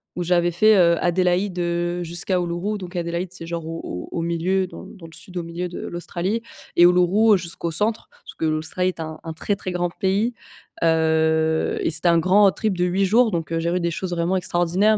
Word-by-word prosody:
où 175 - -2
j'avais 175 0 +2
fait, 215 +5 +5
heu, 170 -2 +5
Adélaïde, 180 +1 +1
heu, 175 0 -1
jusqu'à 175 +2 -1
Uluru, 175 +5 -2
donc 180 -1 -9
Adélaïde, 170 +1 -3
c'est 165 -2 -7
genre 170 -1 -4
au 165 0 -5
au 90 - -6
au 165 - -2
milieu, 175 +3 0
dans - - -10
dans 175 -5 -12
le 165 - -13
sud 180 -1 -8
au 170 - -2
milieu 170 +2 -5
de - - -7
l'Australie 175 +5 -3 0.3
et 175 - +6
Uluru, 180 +5 +5
heu, - - +2
jusqu'au 170 -1 -3
centre 215 +7 -1
parce - - -14
que - - -5
l'Australie 160 +4 0
est 175 - -7
un 155 -1 -6
un 165 -1 -5
très, 200 +5 -2
très 185 -1 -5
grand 175 0 -1
pays, 200 +6 0 0.5
heu 160 -1 +2
et - - +1
c'était 165 +3 +2
un 170 - +5
grand 185 +5 +4
road 195 - +4
trip 215 -4 -1
de 180 - +1
8 190 +2 +1
jours, 225 +3 +4
donc 165 -1 -3
heu, 165 - 0
j'ai 170 +1 -1
vu 180 - 0
des 170 -1 -1
choses 180 +3 -4
vraiment 175 +2 0
extraordinaires, 185 +4 +2
175 Hz, 230 wpm, -22 LUFS, 170-185 Hz, 0.5 s, et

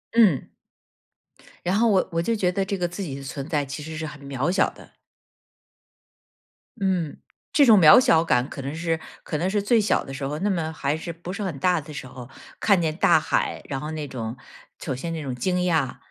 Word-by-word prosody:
嗯， 205 - +4 1.2
然 180 +2 +1
后 230 +2 +4
我 195 -4 +2
我 165 0 0
就 230 +5 0
觉 185 -3 +1
得 195 +1 0
这 195 0 -3
个 175 - 0
自 180 +3 -6
己 145 -8 -5
的 140 - -8
存 135 +1 -6
在 150 -4 0
其 140 +2 -7
实 160 +1 -7
是 160 0 -4
很 150 -1 -9
渺 140 +3 -2
小 190 +2 +2
的。 - - -17 1.9
嗯， 180 -6 0 0.3
这 290 - +5
种 220 -5 +7
渺 160 +7 +9
小 230 -11 +4
感 125 -4 +1
可 140 - -7
能 140 +3 -4
是 165 0 -1 0.2
可 150 - -3
能 180 +4 0
是 205 0 +1
最 225 +3 +3
小 215 - +1
的 135 - -8
时 135 +1 -4
候， 150 +2 -4
那 205 +4 0
么 165 -4 -1
还 145 0 -1
是 170 +1 -6
不 170 +2 -8
是 200 +2 -4
很 175 -8 -3
大 180 +2 +2
的 150 0 -10
时 130 - -7
候， 125 -1 -10 0.3
看 200 -5 +3
见 155 -1 -1
大 160 - +5
海， 160 - -1
然 135 - -2
后 150 +2 -5
那 155 -2 -4
种 115 -2 -5 0.4
首 135 -5 -3
先 165 +6 -4
那 160 - -4
种 130 -3 -4
惊 180 +8 -1
讶， 165 -7 0
160 Hz, 240 characters per minute, -24 LUFS, 140-185 Hz, 1.9 s, 渺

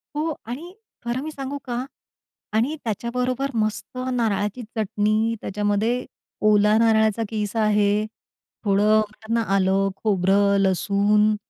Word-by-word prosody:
हो 310 +1 -1
आणि 310 +10 -7 0.3
खरं 240 +2 -1
मी 315 - -5
सांगू 275 0 -5
का 245 +1 -3 0.7
आणि 240 +8 +1
त्याच्याबरोबर 250 +4 -2
मस्त 215 +3 -2 0.2
नारळाची 220 -1 0
चटणी, 215 +1 +1
त्याच्यामध्ये 210 +5 0 0.4
ओला 210 +1 +4
नारळाचा 220 -1 +3
कीस 210 -1 -3
आहे. 210 -1 +2 0.6
थोडं 200 +1 +3
म्हणतात 215 0 0
ना, 230 - +2
आलं, 195 +1 +2
खोबरं, 200 0 +3
लसूण 200 +3 +2
215 Hz, 115 wpm, -23 LUFS, 205-240 Hz, 0.7 s, ओला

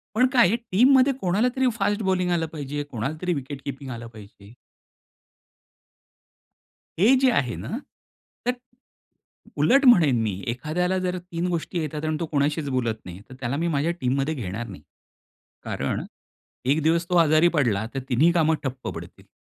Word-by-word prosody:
पण 250 +3 +5
काय 245 -3 +6
आहे 225 - +2
टीममध्ये 255 +5 +4
कोणाला 195 +7 +2
तरी 260 0 +2
फास्ट 205 +2 0
बॉलिंग 185 -2 +1
आलं 165 -2 +1
पाहिजे, 145 -2 -5
कोणाला 120 +5 -3
तरी 180 -1 0
विकेट 140 -1 -6
कीपिंग 135 -1 -6
आलं 120 -1 -7
पाहिजे. 100 -1 -14 2.5
हे 220 +8 +6
जे 265 -1 +5
आहे 125 - 0
ना. 230 - -5 0.7
तर 250 - +3 1.1
उलट 275 +1 +4
म्हणेन 155 - +6
मी 110 - -1 0.2
एखाद्याला 175 +9 -1
जर 185 0 -2
3 175 0 -4
गोष्टी 170 +1 -3
येतात 155 0 -4
आणि 155 0 0
तो 170 - -1
कोणाशीच 145 +1 0
बोलत 120 -4 0
नाही 90 +1 -9
तर - - -9
त्याला 130 +2 -2
मी 170 +2 -1
माझ्या 150 +1 0
टीममध्ये 135 +4 0
घेणार 115 -3 -5
नाही. 90 -6 -10 0.8
कारण - - -3 0.6
एक 145 +5 +2
दिवस 165 +2 +2
तो 180 - +1
आजारी 160 +1 +5
पडला 110 -7 +1
तर 135 - -2
तिन्ही 145 +7 +4
कामं 160 -2 +3
ठप्प 130 -1 -5
पडतील. - - -10
155 Hz, 160 wpm, -24 LUFS, 130-180 Hz, 2.5 s, काय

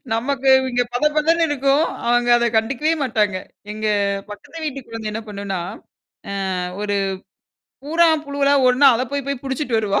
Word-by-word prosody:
நமக்கு 270 +3 -1 0.2
இங்க 245 0 +1
பத 245 - 0
பதன்னு 330 +2 +3
இருக்கும், 280 +2 +2 0.2
அவங்க 240 0 +2
அத 235 0 +1
கண்டுக்கவே 270 +8 +1
மாட்டாங்க. 210 -6 0 0.4
எங்க 215 0 -4 0.4
பக்கத்து 315 +10 -9
வீட்டு 275 -2 -4
குழந்தை 225 -1 -5
என்ன 220 - -4
பண்ணுனா? 200 -2 -4 1.0
அ - - -3 0.2
ஒரு, 205 -1 -1 0.9
பூறான், 320 0 +3
புழுவலாம் 280 -1 +2
ஒடன 265 +2 +6
அத 250 - -1
போய் 280 -1 -2
போய் 280 -3 -3
புடிச்சுட்டு 265 -3 -2
வருவா. 205 -2 0
255 Hz, 150 wpm, -20 LUFS, 220-285 Hz, 1.0 s, ஒடன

